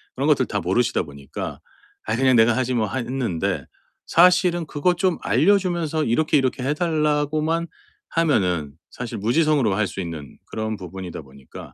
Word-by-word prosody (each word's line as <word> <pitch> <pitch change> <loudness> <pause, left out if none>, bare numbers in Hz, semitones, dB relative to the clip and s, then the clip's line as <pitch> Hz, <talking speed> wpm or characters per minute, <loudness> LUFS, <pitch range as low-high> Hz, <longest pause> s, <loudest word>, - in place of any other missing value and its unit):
그런 - - -1
것들 - - +3
다 - - -3
모르시다 95 +4 +1
보니까 70 -2 -7 0.5
'아 110 - -1
그냥 130 -1 +3
내가 115 +1 +5
하지 130 0 0
뭐.' 115 -3 +1
하 130 - -3
했는데 120 -9 -2 0.4
사실은 175 -1 +4
그것 175 +4 0
좀 180 -1 +1
알려 200 +5 +4
주면서 170 -5 -1
이렇게, 150 +6 +2
이렇게 130 -1 0
해 140 +3 +1
달라고만 155 0 0 0.4
하면은 90 - +1 0.2
사실 120 -2 -6
무지성으로 125 0 +2
할 105 +1 +1
수 - - -8
있는 80 -5 -7
그런 110 0 -4
부분이다 95 -2 -7
보니까 70 -1 -13
130 Hz, 355 characters per minute, -22 LUFS, 100-160 Hz, 0.5 s, 내가